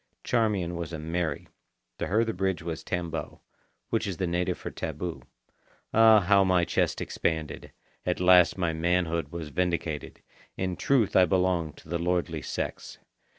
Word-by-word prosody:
Charmian 105 Hz, -7 st, 0 dB
was 85 Hz, -1 st, -5 dB
a -, -, -3 dB
Mary. 80 Hz, -1 st, -3 dB, 0.5 s
To -, -, -2 dB
her 110 Hz, +4 st, +2 dB
the 115 Hz, -, -2 dB
bridge 95 Hz, -2 st, -1 dB
was 80 Hz, -2 st, -5 dB
tambo, 85 Hz, -3 st, -4 dB, 0.5 s
which -, -, 0 dB
is 95 Hz, -4 st, -4 dB
the 95 Hz, -, -1 dB
native 90 Hz, +1 st, -1 dB
for -, -, -6 dB
taboo. 80 Hz, -2 st, -5 dB, 0.7 s
Ah, 110 Hz, -1 st, +7 dB
how 100 Hz, +1 st, +4 dB
my 90 Hz, -2 st, +3 dB
chest -, -, 0 dB
expanded! 80 Hz, -2 st, -3 dB, 0.3 s
At 90 Hz, -, -1 dB
last 90 Hz, 0 st, +6 dB
my 85 Hz, -3 st, 0 dB
manhood 85 Hz, 0 st, 0 dB
was 85 Hz, -3 st, -6 dB
vindicated. 85 Hz, -2 st, -2 dB, 0.3 s
In 95 Hz, -1 st, -2 dB
truth 125 Hz, -3 st, +2 dB
I 90 Hz, -, +7 dB
belonged 90 Hz, -3 st, 0 dB
to -, -, -16 dB
the 85 Hz, +1 st, -2 dB
lordly 85 Hz, -2 st, -1 dB
sex. -, -, -5 dB
90 Hz, 155 wpm, -27 LUFS, 85-95 Hz, 0.7 s, Ah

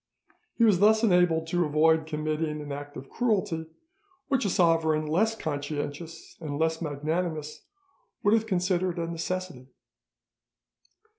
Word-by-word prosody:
He 235 Hz, -, +2 dB
was 210 Hz, -6 st, +5 dB
thus 220 Hz, +2 st, +5 dB
enabled 180 Hz, -5 st, +3 dB
to 175 Hz, +1 st, +1 dB
avoid 160 Hz, +1 st, +3 dB
committing 155 Hz, 0 st, -2 dB
an 145 Hz, -1 st, -7 dB
act 145 Hz, +1 st, -7 dB
of 135 Hz, +1 st, -9 dB
cruelty, 190 Hz, -, -1 dB, 0.6 s
which 270 Hz, -5 st, +1 dB
a -, -, +1 dB
sovereign 165 Hz, -3 st, +2 dB
less 210 Hz, +9 st, +1 dB
conscientious 150 Hz, 0 st, -5 dB
and 145 Hz, -3 st, -4 dB
less 160 Hz, +1 st, 0 dB
magnanimous 155 Hz, +1 st, -3 dB, 0.6 s
would 205 Hz, -, +4 dB
have 225 Hz, 0 st, +2 dB
considered 185 Hz, -2 st, 0 dB
a 170 Hz, -, -1 dB
necessity. 170 Hz, -4 st, -4 dB
165 Hz, 130 wpm, -27 LUFS, 155-185 Hz, 0.6 s, was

